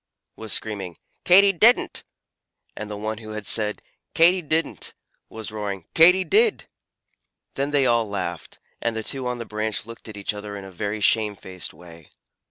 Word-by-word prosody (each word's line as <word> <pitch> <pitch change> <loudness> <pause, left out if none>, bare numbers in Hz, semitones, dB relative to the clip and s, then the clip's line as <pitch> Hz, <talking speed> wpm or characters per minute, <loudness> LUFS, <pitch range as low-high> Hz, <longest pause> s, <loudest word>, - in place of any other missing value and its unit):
was 110 -1 -7
screaming 100 -6 -2 0.3
"Katy 195 +2 +6
didn't!" 225 +7 +4 0.7
and 105 - -7
the 105 - -5
one 110 +1 -4
who 110 -1 -9
had 110 -1 -6
said 105 -1 +1 0.3
"Katy 175 +3 +5
didn't!" 160 +1 -2 0.3
was 110 -1 -8
roaring 100 -4 -5
"Katy 180 +3 +6
did!" 430 - +2 0.9
Then 140 +1 -2
they 145 -2 +2
all 115 -3 +2
laughed, 100 -2 -5 0.2
and 115 -1 -1
the 110 - -3
two 130 +2 -2
on 125 0 -2
the 115 - -6
branch 110 0 -3
looked 115 0 -10
at 105 - -9
each 100 0 -3
other 105 0 -7
in 100 - -8
a 95 - -10
very 105 +4 -4
shamefaced 100 -4 0
way. 85 -1 -14
110 Hz, 170 wpm, -23 LUFS, 105-135 Hz, 0.9 s, Katy